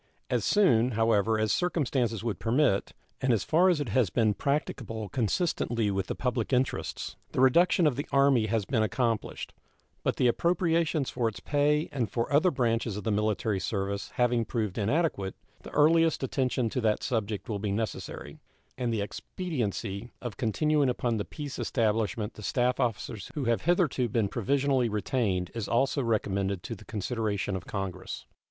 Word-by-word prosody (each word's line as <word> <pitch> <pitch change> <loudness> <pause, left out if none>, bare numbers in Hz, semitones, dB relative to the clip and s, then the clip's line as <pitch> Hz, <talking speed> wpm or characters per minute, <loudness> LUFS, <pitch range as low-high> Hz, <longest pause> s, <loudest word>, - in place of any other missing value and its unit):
As - - +1
soon, 125 - +3
however, 110 -1 +2
as 110 0 +1
circumstances 130 - 0
would 115 -6 -2
permit, 120 -3 +1 0.3
and 130 - +2
as 110 -5 +2
far 175 +4 +4
as 175 -4 +2
it 145 -5 -2
has 110 -1 +2
been 110 +2 +2
practicable 115 -5 -2
consistently 115 - 0
with 95 -1 -1
the - - -3
public 125 -2 -1
interests, 130 0 -1 0.2
the - - -1
reduction 170 +7 +5
of 145 -5 +3
the 145 - -3
Army 140 -5 +4
has 110 -1 0
been 115 -1 +1
accomplished; 115 0 -1 0.5
but - - 0
the - - +1
appropriations 165 0 +1
for 120 - 0
its 105 -4 -4
pay 150 - +1
and 125 -6 -1
for 120 +4 -2
other 155 +6 +5
branches 115 - 0
of 105 - -5
the 110 - 0
military 105 -1 0
service 100 0 -2
having 120 -1 +2
proved 110 -3 -2
inadequate, 110 - 0 0.3
the - - -10
earliest 160 0 +3
attention 130 -2 0
to 125 - -1
that 110 -2 +1
subject 110 -5 -2
will 105 -3 -2
be 105 0 -2
necessary; 110 +2 -4 0.4
and 120 -2 0
the 110 -2 0
expediency 115 - -4
of 120 -6 -6
continuing 145 +6 +1
upon 120 -2 0
the 105 - -2
peace 145 -2 -7
establishment 110 -1 0
the - - -11
staff 125 +4 0
officers 115 -4 -2
who 145 - -2
have 115 -1 +1
hitherto 165 -8 +2
been 110 -1 +1
provisionally 130 +3 +1
retained 105 -4 -1
is 115 -3 -4
also 135 +4 +1
recommended 100 -5 -1
to - - -5
the 105 - -11
consideration 105 -2 -2
of 90 -1 -6
Congress. 95 -2 -5
115 Hz, 170 wpm, -28 LUFS, 105-135 Hz, 0.5 s, reduction